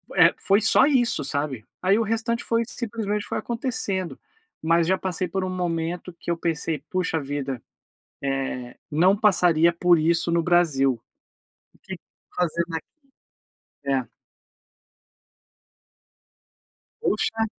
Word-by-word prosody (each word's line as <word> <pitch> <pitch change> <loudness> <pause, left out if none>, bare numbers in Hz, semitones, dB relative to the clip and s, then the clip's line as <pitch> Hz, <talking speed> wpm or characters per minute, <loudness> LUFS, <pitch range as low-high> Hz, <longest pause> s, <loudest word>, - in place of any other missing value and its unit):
eh, - - +6
foi 200 +1 +3
só 220 - +5
isso 240 - +2
sabe. 140 -5 -3 0.2
Aí 195 +3 +4
o - - +2
restante 225 +2 -1
foi 230 0 +1
simplesmente 210 -4 -3
foi - - -3
acontecendo, 225 -7 -3 0.4
mas 165 +1 +3
já 190 +1 +3
passei 185 -1 -2
por 190 +3 -2
um - - -3
momento 175 -1 -3
que - - -7
eu 170 - -1
pensei, 165 -2 -2
"Puxa 180 -3 0
vida, 140 -3 -4 0.6
eh, 135 -2 -3
não 180 +6 +4
passaria 175 -5 +4
por 175 0 +4
isso 165 +2 +1
no 170 0 +3
Brasil. 145 -8 +2 0.7
O - - -25
que - - -7 0.4
fazendo 170 -1 -1
aqui?". 160 - -7 1.0
É. 135 -3 0 2.9
Puxa. 225 +1 0
170 Hz, 125 wpm, -24 LUFS, 155-200 Hz, 2.9 s, eh